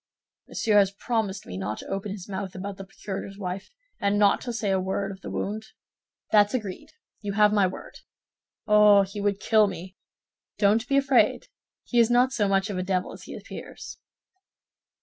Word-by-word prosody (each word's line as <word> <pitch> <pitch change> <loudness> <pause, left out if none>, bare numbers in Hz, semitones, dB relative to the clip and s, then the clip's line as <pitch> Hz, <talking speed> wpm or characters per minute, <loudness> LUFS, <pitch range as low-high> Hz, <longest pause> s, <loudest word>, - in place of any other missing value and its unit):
"Monsieur 210 -2 +2
has 195 -1 +4
promised 205 -1 -2
me 90 - -6
not 105 +3 -3
to - - -9
open 195 +1 -4
his 195 -3 -7
mouth 190 -1 -5
about 195 +1 -6
the 195 - -7
procurator's 195 0 -7
wife, 185 -1 -5 0.3
and 200 0 +1
not 205 -1 +4
to 245 - -4
say 220 -3 -1
a 190 - +2
word 195 +1 -2
of 190 0 -11
the - - -7
wound?" 215 +2 -4 0.6
"That's 210 +2 +5
agreed; 205 -7 -5 0.3
you 205 -2 -3
have 210 0 +4
my 200 -3 +4
word." 185 - -9 0.7
"Oh, 210 -1 +6
he 200 +1 -6
would 200 -1 0
kill 215 -1 +4
me!" 185 0 -7 0.6
"Don't 220 +3 +3
be 275 - +2
afraid; 275 - +3 0.3
he 240 - 0
is 230 -1 +5
not 250 +2 +3
so 210 -5 +1
much 195 +1 +1
of 185 - -3
a - - -1
devil 185 -1 -1
as - - -12
he - - -8
appears." - - -9
200 Hz, 190 wpm, -26 LUFS, 195-215 Hz, 0.7 s, Oh